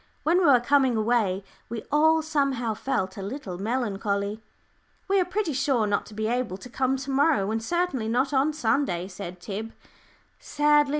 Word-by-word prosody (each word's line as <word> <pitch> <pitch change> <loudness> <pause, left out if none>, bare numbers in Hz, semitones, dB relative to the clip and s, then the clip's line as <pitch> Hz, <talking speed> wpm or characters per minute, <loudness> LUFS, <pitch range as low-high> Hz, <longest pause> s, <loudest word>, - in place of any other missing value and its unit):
When 340 +4 +3
we 365 - +2
were 270 -5 +7
coming 260 -1 +3
away, 215 -4 +1 0.3
we 230 -1 -5
all 315 +2 +4
somehow 275 -7 0
felt 200 -5 -2
a - - -5
little 195 -4 -6
melancholy. 205 -2 -2 0.7
"We 390 0 +3
are 365 - +2
pretty 365 -3 -1
sure 260 -4 +1
not 205 -1 -1
to 210 - -12
be 215 0 -2
able 235 -4 -1
to 250 - -11
come 265 +2 0
to 270 +1 -5
morrow, 270 -7 +2
and 225 0 -1
certainly 345 -4 -1
not 255 +5 +1
on 275 +3 +3
Sunday," 225 - 0
said 180 -2 -8
Tib, 215 +5 -6 0.7
sadly. 295 -1 +3
245 Hz, 175 wpm, -26 LUFS, 210-290 Hz, 0.7 s, were